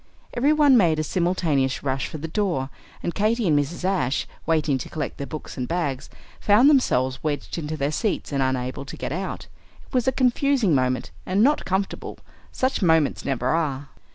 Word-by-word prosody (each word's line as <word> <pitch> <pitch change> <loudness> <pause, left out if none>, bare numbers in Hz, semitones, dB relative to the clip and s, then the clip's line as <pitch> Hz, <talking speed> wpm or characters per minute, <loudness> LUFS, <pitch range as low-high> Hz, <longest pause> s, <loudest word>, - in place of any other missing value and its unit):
Every 270 +5 +2
one 295 -3 +5
made 170 -7 +3
a 155 - 0
simultaneous 155 -6 0
rush 135 -1 -1
for - - -7
the 160 +2 -5
door; 160 -7 -1 0.3
and 170 - -2
Katy 215 +1 +1
and 150 -3 +4
Mrs. 165 +5 -3
Ashe, 175 -9 0 0.2
waiting 155 -4 +1
to - - -7
collect 150 -3 -4
their 140 - -4
books 155 - -8
and 125 -1 -2
bags, 150 -6 -2 0.3
found 230 +8 +5
themselves 130 - +2
wedged 150 +2 -3
into 155 0 -4
their 140 0 0
seats 210 +3 -2
and 140 -1 0
unable 130 0 -1
to 140 - -9
get - - -4
out. 185 +5 -4 0.4
It - - -23
was 250 -1 +1
a - - +5
confusing 255 - +2
moment, 130 -2 0
and 195 +3 +1
not 295 +4 +3
comfortable; 190 +1 -2 0.3
such 260 -2 -1
moments 160 -5 +2
never 130 -2 -1
are. 145 -3 -1
160 Hz, 185 wpm, -24 LUFS, 140-205 Hz, 0.4 s, one